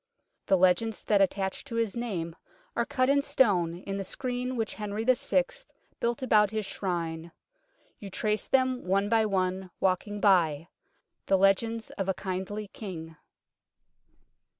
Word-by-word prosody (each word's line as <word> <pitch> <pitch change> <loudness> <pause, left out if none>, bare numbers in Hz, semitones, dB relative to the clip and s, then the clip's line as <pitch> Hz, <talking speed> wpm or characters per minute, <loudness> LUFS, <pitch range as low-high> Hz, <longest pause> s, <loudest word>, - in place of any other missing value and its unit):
The 190 - +5
legends 185 +5 +2
that 205 -2 +3
attach 190 0 0
to 245 -4 -6
his 230 -2 0
name 185 -9 -3 0.4
are 235 +1 0
cut 255 -3 +1
in 280 +1 +4
stone 185 - +2
in 195 0 -4
the 195 - -2
screen 250 +4 -3
which 225 -3 -1
King - - -15
Henry 210 +1 -3
VI. 255 - +3 0.6
built 235 +2 -1
about 210 -4 +4
his 215 0 -2
Shrine. 170 -4 -3 0.7
You 200 - -8
trace 210 +2 -1
them 260 -1 +2
one 195 +2 +2
by 220 -1 +3
one, 185 -1 -1
walking 195 +2 0
by; 170 -6 +3 0.6
the 195 - +4
legends 220 +4 +2
of 195 -1 -3
a 190 - +1
kindly 190 +4 -4
King. 165 -7 -8
200 Hz, 150 wpm, -28 LUFS, 185-230 Hz, 0.7 s, The